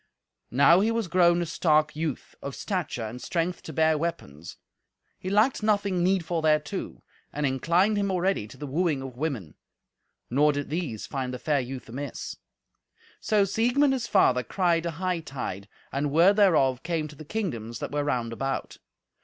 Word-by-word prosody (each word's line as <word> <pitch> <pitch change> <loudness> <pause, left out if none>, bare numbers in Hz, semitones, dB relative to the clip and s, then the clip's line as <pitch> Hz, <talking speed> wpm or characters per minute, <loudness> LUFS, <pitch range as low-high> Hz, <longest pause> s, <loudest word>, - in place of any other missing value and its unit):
Now 145 +8 +6
was 225 +2 +1
he - - -11
grown 175 -1 +4
a - - -3
stark 155 -3 +2
youth, 155 -3 -4
of 140 - -6
stature 180 - -3
and 120 +3 -7
strength 175 0 -2
to - - -8
bear 160 -1 +2
weapons; 85 - -5 0.6
he 185 - -4
lacked 215 +7 +3
nothing 200 -4 +1
needful 175 -3 +1
thereto, 155 -2 -1 0.3
and 150 0 -2
inclined 170 +10 +2
him 200 -1 0
already 185 - 0
to - - -13
the 145 - -6
wooing 150 -1 0
of 130 -2 -8
women. 125 - -3 0.8
Nor 145 +4 +4
did 145 0 -4
these 155 -10 -3
find 130 -2 -3
the 125 - -4
fair 145 +2 +1
youth 130 0 -6
amiss. 135 +3 -6 0.8
So 210 -2 +2
Siegmund 245 +8 +2
his 245 -3 -2
father 130 - +4
cried 170 - 0
a - - -2
hightide, 150 - -4 0.2
and 145 +1 -1
word 175 +7 +5
thereof 145 -11 +4
came 165 -2 -2
to 150 - -12
the 155 - -10
kingdoms 140 - -4
that - - -5
were 145 0 0
round 120 -5 -1
about. 135 +3 -3
160 Hz, 170 wpm, -27 LUFS, 135-185 Hz, 0.8 s, Now